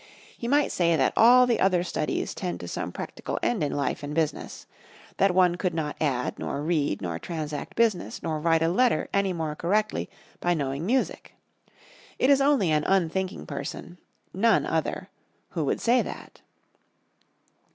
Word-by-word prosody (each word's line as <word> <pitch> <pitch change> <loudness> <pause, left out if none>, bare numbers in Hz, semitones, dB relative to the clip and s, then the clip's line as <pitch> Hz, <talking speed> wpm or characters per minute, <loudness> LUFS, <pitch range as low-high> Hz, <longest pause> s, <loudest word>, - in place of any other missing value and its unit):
He 235 - -5
might 285 +3 +2
say 170 -2 +2
that 135 -4 +2
all 250 +2 +7
the 240 -2 +1
other 185 -2 +3
studies 170 -3 -2
tend 180 -2 -4
to 90 - -7
some - - -4
practical - - -5
end 120 +6 +1
in 145 - -1
life 145 - -2
and 145 +1 -5
business: 160 -2 -2 0.5
that 195 -2 +3
one 180 -2 +4
could 175 -1 -1
not 150 -2 -2
add, 130 -5 -1
nor 140 +1 -3
read, 150 - 0
nor 85 -2 -3
transact 155 - -5
business, 225 -6 0
nor 160 -2 -2
write 165 0 +2
a - - +3
letter 240 +8 +2
any 200 -1 +2
more 160 -3 -3
correctly 210 +7 0 0.3
by 175 0 +1
knowing 140 +2 -3
music. 255 +3 -1 0.8
It 265 - +3
is 275 0 +5
only 275 - +3
an 150 -1 +2
unthinking 190 0 0
person 150 +5 -7 0.3
none 225 +5 +3
other - - -2 0.4
who - - -2
would - - 0
say 245 +2 +3
that. - - -8
175 Hz, 165 wpm, -26 LUFS, 150-200 Hz, 0.8 s, all